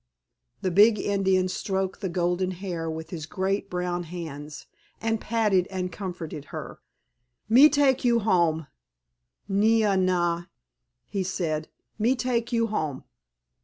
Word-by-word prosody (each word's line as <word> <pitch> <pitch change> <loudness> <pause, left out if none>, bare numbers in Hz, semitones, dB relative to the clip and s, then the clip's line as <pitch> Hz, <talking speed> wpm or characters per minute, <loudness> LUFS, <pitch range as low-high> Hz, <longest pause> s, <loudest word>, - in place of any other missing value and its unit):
The 185 - +1
big 210 +4 +6
Indian 190 -2 +1
stroked 190 +1 -2
the 190 - -2
golden 180 +1 0
hair 175 -4 -4
with 160 0 -6
his 160 -4 -5
great 195 +3 -1
brown 180 0 -2
hands 155 -3 -7 0.3
and 225 -1 -1
patted 210 -5 +2
and 185 -1 -3
comforted 170 -6 -6
her. - - -8 0.7
"Me 255 +7 +8
take 280 -3 +3
you 240 -1 +4
home, 170 -6 +2 0.8
Nee 220 +3 +3
ah 205 -2 +3
nah," 175 -2 +1 0.6
he 200 - -3
said, 165 -4 -2 0.3
"me 235 +5 +3
take 240 -2 -1
you 230 -1 +2
home." 155 -11 -3
185 Hz, 130 wpm, -26 LUFS, 175-215 Hz, 0.8 s, Me